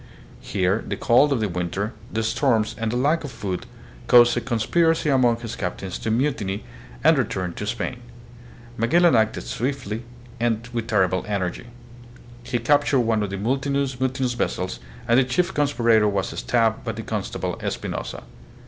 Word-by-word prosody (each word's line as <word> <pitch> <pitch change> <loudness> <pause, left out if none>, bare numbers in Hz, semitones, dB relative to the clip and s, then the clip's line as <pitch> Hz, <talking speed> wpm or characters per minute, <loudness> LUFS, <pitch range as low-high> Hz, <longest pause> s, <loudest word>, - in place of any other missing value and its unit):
Here 95 +2 0
the - - -2
cold 140 +5 +4
of 130 -5 +1
the 105 - +1
winter, 90 +5 -3 0.2
the 110 +1 -1
storms, 115 -2 +1
and 115 -1 -2
the - - -2
lack 145 +7 +2
of 145 - -5
food 95 -6 -4 0.4
caused 120 0 +7
a 120 - 0
con 120 0 -2
spiracy 160 +4 +2
among 120 -3 +3
his 115 -2 -5
captains 95 0 -4
to - - -3
mutiny 110 -5 -1 0.4
and 160 -2 +5
return 95 -7 -2
to 105 - -5
Spain. 120 +2 -3 0.8
Magellan 165 +8 +4
acted 110 -1 +1
with - - -7 0.3
swift 115 -6 -6 0.5
and 115 -1 0 0.2
terrible 95 -4 +2
energy. 100 0 -3 0.7
He 120 - -2
cap 145 +5 +3
tured 135 -4 +2
one 110 -2 +1
of 105 - -2
the 100 - -4
mutinous 135 +5 0
vessels, 125 -7 -2 0.3
and 120 +1 +5
the - - +5
chief 175 +9 0
conspirator 115 -7 +3
was 100 -2 0
stabbed 115 -2 +1
by - - -3
the - - -6
constable, - - -3
Espinosa. - - -4
115 Hz, 165 wpm, -23 LUFS, 105-135 Hz, 0.8 s, caused